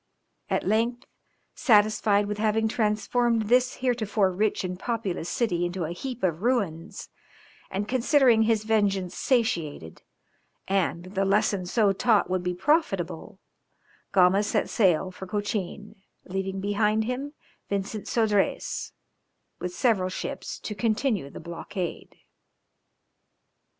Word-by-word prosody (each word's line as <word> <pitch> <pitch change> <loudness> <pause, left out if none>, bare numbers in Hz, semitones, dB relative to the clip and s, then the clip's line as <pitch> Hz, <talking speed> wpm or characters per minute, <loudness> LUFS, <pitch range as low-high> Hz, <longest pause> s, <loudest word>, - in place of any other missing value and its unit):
At - - 0
length, 235 +4 0 0.5
satisfied 210 -2 +3
with 210 0 -4
having 220 +1 +2
transformed 225 +1 +1
this 250 +1 +3
heretofore 215 -5 +1
rich 205 +3 0
and 180 0 -4
populous 200 -8 -3
city 180 -8 0
into 175 0 -2
a 160 - -3
heap 245 +6 -6
of 170 -2 0
ruins, 200 -8 -1 0.6
and 200 +2 -3
considering 255 -1 +4
his 220 -1 +2
vengeance 200 -4 +1
satiated, 170 - -1 0.7
and 190 -3 0
that 185 +2 -12
the 195 0 +1
lesson 195 -1 +1
so 205 0 +3
taught 205 -2 +2
would 185 -1 +1
be 180 0 -2
profitable, 195 - 0 0.7
Gama 185 +1 +5
set 210 - -1
sail 185 -4 +2
for 190 +1 -9
Cochin, 205 0 -3 0.3
leaving 190 +1 -3
behind 210 +2 +1
him 260 +5 -4 0.4
Vincent 200 +1 -3
Sodrez, 210 -4 0 0.7
with 180 - -3
several 195 -4 +1
ships, - - -5
to 210 - -4
continue 215 - 0
the - - -9
blockade. 170 +2 -6
205 Hz, 120 wpm, -26 LUFS, 185-225 Hz, 0.7 s, Gama